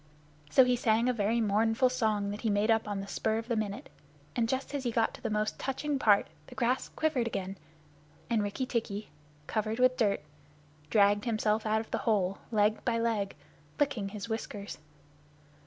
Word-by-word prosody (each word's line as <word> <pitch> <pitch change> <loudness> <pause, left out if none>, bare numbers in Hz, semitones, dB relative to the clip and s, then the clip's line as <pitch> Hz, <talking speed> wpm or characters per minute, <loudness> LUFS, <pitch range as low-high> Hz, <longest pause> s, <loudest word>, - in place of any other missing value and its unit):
So 260 - +6
he 250 0 +3
sang 230 -1 +2
a 250 - +3
very 225 +1 +1
mournful 225 +4 +3
song 215 -5 0
that 205 - -6
he 225 - 0
made 205 +2 +2
up 225 -1 +2
on 205 -1 -2
the 195 - -7
spur 220 +2 0
of 225 0 -4
the 240 - 0
minute, 210 -2 -3 0.5
and 230 -2 +1
just 265 +2 -2
as 280 -2 -2
he 245 - 0
got 225 -1 +1
to - - -11
the 225 - -2
most 215 0 -1
touching 275 +1 -2
part, 205 -5 +5 0.2
the - - -12
grass 250 +1 0
quivered 290 -7 0
again, 195 -3 -3 0.7
and 230 -3 +1
Rikki 205 +6 -2
tikki, 220 -4 -3 0.3
covered 215 +3 -1
with 255 0 +4
dirt, 200 -7 +2 0.7
dragged 205 +1 +4
himself 215 -1 +1
out 220 +1 +2
of 220 - -12
the - - 0
hole 195 -4 +1
leg 210 0 +2
by 235 -2 +1
leg, 225 -4 0 0.4
licking 250 -9 0
his 210 +1 -6
whiskers. 210 -4 -5
220 Hz, 190 wpm, -30 LUFS, 205-240 Hz, 0.7 s, So